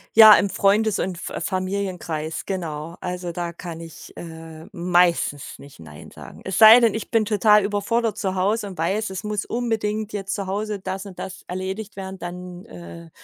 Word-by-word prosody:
Ja, 220 -1 +11
im 200 - +1
Freundes 205 +2 +2
und 185 -2 -2
F - - -4
Familienkreis, 185 -5 -3
genau. 165 -3 -5
Also, 180 -1 -4
da 170 0 -4
kann 170 -1 -8
ich, 165 -1 -11
äh, 160 -1 -10
meistens 175 -5 +1
nicht 140 -7 -15
„Nein“ 75 -2 -12
sagen. - - -12
Es 190 - -3
sei 225 +2 +10
denn, 230 -3 +4
ich 220 - -5
bin 225 -2 +3
total 210 0 +4
überfordert 210 +3 -1
zu 190 -2 -2
Hause 205 +3 0
und 190 -3 -9
weiß, 190 +6 -1
es 190 +2 -6
muss 210 -1 -3
unbedingt 220 -3 -2
jetzt 195 -1 -4
zu 200 -1 -4
Hause 205 +1 -3
das 190 +1 -5
und 195 -3 -11
das 190 0 -7
erledigt 190 +3 -5
werden, 190 -1 -7
dann, 180 0 -8
äh, 85 -2 -11
190 Hz, 180 wpm, -23 LUFS, 175-210 Hz, -, Ja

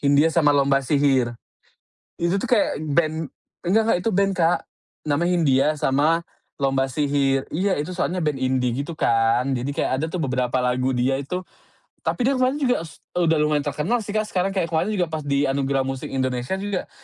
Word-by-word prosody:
Hindia 145 +2 +4
sama 160 -3 +3
Lomba 140 -1 +3
Sihir. 135 -4 +2 0.9
Itu 170 +3 +1
tuh 255 - -4
kayak 215 -10 +2
band 155 0 0 0.3
enggak 200 +6 +3
enggak, - - +3
itu 225 - +1
band 195 +1 +2
Kak. 170 0 +3 0.5
Namanya 165 +5 +1
Hindia 145 -6 +3
sama 150 +6 +2 0.4
Lomba 135 -1 +1
Sihir, 135 -1 0
iya 185 +4 +1
itu 150 +4 -3
soalnya 180 -1 -2
band 150 -3 -1
indie 130 -1 +1
gitu 165 - -7
kan. 115 -2 +2 0.2
Jadi 140 +3 -3
kayak 130 - 0
ada 160 - -1
tuh 165 0 -3
beberapa 125 -1 0
lagu 125 +1 0
dia 130 +2 +1
itu 180 +7 -4 0.6
tapi 250 0 0
dia 275 - +2
kemarin 255 +3 +1
juga 250 - +1
s 160 - -12 0.2
udah 165 -2 +2
lumayan 150 -1 +1
terkenal 155 +11 -1
sih 205 - -6
Kak. 215 0 -1
Sekarang 190 0 -1
kayak 185 -4 -1
kemarin 170 +6 0
juga 185 -4 0
pas 155 -1 -4
di 140 0 +1
Anugerah 135 0 0
Musik 135 -1 -4
Indonesia 130 +4 -1
juga, 200 -1 -3
150 Hz, 185 wpm, -23 LUFS, 135-180 Hz, 0.9 s, Hindia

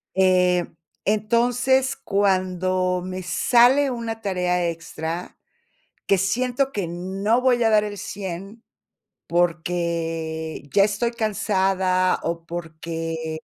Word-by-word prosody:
Eh, 180 -2 +3 0.4
entonces, 245 +5 +2
cuando 185 -2 0
me 185 0 -5
sale 245 +9 +4
una 230 -2 -4
tarea 180 -3 0
extra, 165 +1 -5 0.7
que 195 - +3
siento 250 +7 0
que 200 -8 -2
no 195 +7 -1
voy 250 -2 +3
a 225 - +4
dar 210 -1 +4
el 205 -1 -5
100 195 +3 -7 0.6
porque 165 -2 -1
ya 195 - +6
estoy 210 +3 0
cansada 190 -4 +1
o 165 0 -3
porque 165 -1 -5
185 Hz, 100 wpm, -23 LUFS, 170-215 Hz, 0.7 s, ya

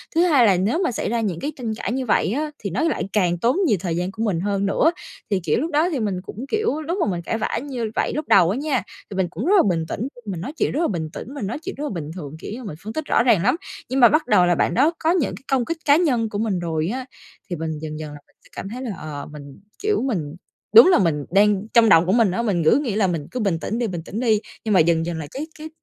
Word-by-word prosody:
thứ 330 - +4
hai 290 -9 +5
là 195 -4 +4
nếu 205 - +1
mà 360 - +1
xảy - - -3
ra 235 0 0
những 190 -7 -2
cái 295 - -3
tranh 235 -6 -4
cãi - - -4
như 260 +1 -2
vậy 210 - +2
á 300 +4 -2
thì 200 - -4
nó 200 - -2
lại 325 - 0
càng 180 -4 +2
tốn 235 - +1
nhiều 215 - +3
thời 170 -2 -2
gian 180 +2 -2
của 220 +3 -4
mình 200 -7 0
hơn 200 +1 -1
nữa. 285 +11 +3 0.4
Thì, 200 -3 +1
kiểu, 165 0 0
lúc 325 +3 -2
đó 310 +4 +2
thì 300 -7 -2
mình 200 -5 -2
cũng, 215 +6 -8
kiểu 430 -8 0
lúc 335 +5 -3
mà - - +1
mình 175 -1 -3
cãi 220 - -2
vã 220 - -2
như 260 -5 -4
vậy - - 0
lúc 300 0 -3
đầu 175 -4 +5
á 200 - -1
nha, 275 -6 -1 0.3
thì 200 - -7
mình 190 -2 +1
cũng 185 +8 -5
rất 390 +5 +4
là - - +6
bình 165 -3 0
tĩnh, 230 +9 -3 0.2
mình 185 -5 -4
nói 270 - -5
chuyện - - +1
rất 310 - -1
là 335 - +2
bình 160 -5 -3
tĩnh, 260 - -8
mình 275 -9 -4
nói 235 +8 -4
chuyện 315 - -6
rất 290 - -4
là 300 - -2
bình 160 -5 -5
thường, 155 -4 -7
kiểu - - -7
như 250 +3 -7
mình 195 -9 -6
phân 215 +2 -6
tích 315 +3 -3
rõ - - +2
ràng 225 -8 +3
lắm, 250 - +3 0.3
nhưng 265 - 0
mà 240 -2 +8
bắt 310 +1 +1
đầu 180 - +5
là 175 0 +3
bạn - - +1
đó 285 +7 +4
có 320 - +2
những 325 - 0
cái 225 - -14
công 260 -3 +2
kích 330 - -3
cá 285 - +6
nhân 255 -10 +1
của 205 - -4
mình 210 -5 0
rồi 165 -2 -2
á 260 0 -4 0.4
thì 175 - -2
mình 160 -1 -4
dần 155 0 -6
dần 155 -1 -6
là 145 - -10
mình - - -33
sẽ - - -20
cảm 195 - -6
thấy 245 +4 -6
là 230 -7 -4
ờ, 145 -2 -7
mình, 145 -2 -11 0.2
kiểu, 415 0 +1
mình 165 - -2 0.4
đúng 460 - +11
là 370 - +5
mình 155 -6 0
đang 205 +1 +3
trong 230 -2 +6
đầu 165 -1 +6
của 185 - +1
mình 220 -3 +3
á 230 - -1
mình 195 -8 0
cứ 160 - +5
nghĩ 245 -9 -2
là 210 -3 +2
mình 165 -5 -3
cứ 250 - -4
bình 195 -7 0
tĩnh 220 +7 -3
đi, 240 - 0
bình 175 -5 -4
tĩnh 215 - -5
đi 225 -4 +2 0.3
nhưng 215 - +1
mà 190 - +5
dần 165 0 +3
dần 170 -1 -3
là 155 -2 -5
cái 295 +4 -5
cái 310 +1 -7
215 Hz, 310 wpm, -22 LUFS, 175-265 Hz, 0.4 s, đúng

